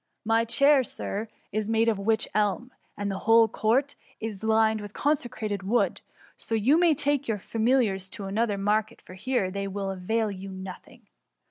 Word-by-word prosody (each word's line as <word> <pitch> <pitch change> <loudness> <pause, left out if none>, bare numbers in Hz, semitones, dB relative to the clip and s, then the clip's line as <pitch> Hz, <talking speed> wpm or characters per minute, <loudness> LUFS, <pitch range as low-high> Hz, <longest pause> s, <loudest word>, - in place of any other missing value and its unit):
My 225 +1 +2
chair. 275 +4 +4
Sir, 215 -1 -4 0.2
is 215 +1 -2
made 225 0 +2
of 220 -3 +1
witch 220 +2 +1
elm» 210 +4 0 0.3
and 205 0 -2
the 190 - -4
whole 225 0 +5
court 240 +7 +1 0.3
is 220 -2 -6
lined 220 0 +2
with 205 0 -9
ccmsecrated 235 -8 -1
wood; 215 +6 0 0.3
so 225 - -4
you 255 +9 +3
may 340 -3 +4
take 285 -1 0
your 220 -2 0
fami 230 +6 +1
liars 195 -6 0
to 200 - -6
another 205 +1 0
market, 215 +3 0
for - - -14
here 190 -1 -1
they 200 +1 -3
will 195 0 -3
avail 210 +4 -1
you 195 0 -8
nothing.'' 190 -1 -10
220 Hz, 175 wpm, -26 LUFS, 200-235 Hz, 0.3 s, whole